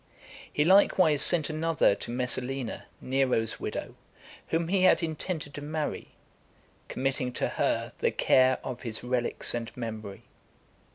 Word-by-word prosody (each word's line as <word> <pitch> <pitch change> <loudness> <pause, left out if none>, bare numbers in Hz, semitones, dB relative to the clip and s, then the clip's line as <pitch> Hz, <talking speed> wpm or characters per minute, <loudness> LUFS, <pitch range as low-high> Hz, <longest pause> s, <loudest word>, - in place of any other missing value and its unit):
He 150 - +2
likewise 185 -5 +5
sent 160 -4 +4
another 160 -6 +2
to - - -7
Messalina, 125 +1 -2
Nero's 130 -4 0
widow, - - -5 0.5
whom 165 0 0
he 195 0 +2
had 185 -1 +5
intended 155 -2 -4
to 145 - -7
marry, 150 +1 -3 0.8
committing 130 -1 -2
to - - -1
her - - -1
the - - +2
care 130 0 +3
of 130 -2 -6
his 115 -3 -5
relics 125 -1 -1
and 115 -1 -3
memory. 110 -4 -6
135 Hz, 130 wpm, -28 LUFS, 125-155 Hz, 0.8 s, likewise